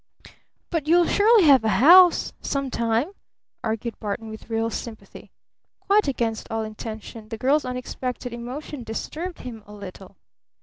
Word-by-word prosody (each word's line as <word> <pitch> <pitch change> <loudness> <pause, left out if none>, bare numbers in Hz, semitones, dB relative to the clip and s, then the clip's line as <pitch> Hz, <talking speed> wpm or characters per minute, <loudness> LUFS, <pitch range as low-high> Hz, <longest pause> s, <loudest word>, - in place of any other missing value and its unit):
"But 320 -4 -2
you'll 345 +2 +5
surely 430 +2 +5
have 275 -6 +6
a 220 - +1
house 350 - +7
some 275 -2 -2
time," 230 +8 0 0.5
argued 225 +1 -3
Barton 220 +2 -4
with 220 +1 -11
real 225 0 -1
sympathy. 225 -1 -8 0.5
Quite 410 -2 +3
against 230 -5 -2
all 225 0 -2
intention 215 0 -8
the 225 - -5
girl's 275 +6 +2
unexpected 250 0 -5
emotion 250 +3 -7
disturbed 320 +10 -5
him 230 -4 -8
a 210 - -12
little. 195 -1 -11
240 Hz, 140 wpm, -24 LUFS, 220-295 Hz, 0.5 s, house